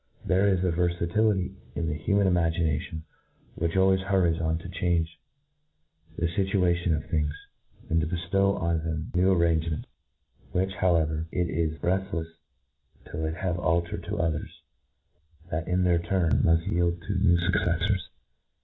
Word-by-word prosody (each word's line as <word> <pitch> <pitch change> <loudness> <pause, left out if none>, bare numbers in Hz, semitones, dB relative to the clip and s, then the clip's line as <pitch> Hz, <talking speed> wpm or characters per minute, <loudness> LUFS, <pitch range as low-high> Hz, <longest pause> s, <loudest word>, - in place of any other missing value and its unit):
There 95 +2 +3
is 95 -2 +2
a 90 - +2
verfatility 90 +3 +1 0.2
in 85 - -1
the 75 - -1
human 100 +6 +1
imagination 80 -3 0 0.5
which 85 +2 -1
always 95 0 +4
hurries 95 -4 +1
on 80 0 0
to 85 - -8
change 85 -2 -1 1.0
the 85 - 0
fituations 90 -2 +1
of - - -6
things, 75 -2 0 0.5
and 80 0 +2
to 75 - -1
beftow 95 +4 +1
on 85 -1 0
them 80 -1 -3
new 90 +2 +3
arrangements, 85 -3 +1 0.7
ivhich 95 +1 +1
however 80 -3 +1
it 90 -1 -1
is 80 -1 -1
reftlefs 90 -3 -1 0.8
till 80 - -3
it 80 +1 -2
have 90 -1 -2
altered 85 0 0
to - - -3
others, 80 -2 -3 0.9
that 80 +2 -2
w 90 +1 +1
their 90 -1 +3
turn 85 -1 +1
mull 80 0 +4
yield 85 +1 0
to 95 +2 -2
new 90 -3 +4
fucceffors. 90 +2 0
85 Hz, 145 wpm, -27 LUFS, 80-95 Hz, 1.0 s, always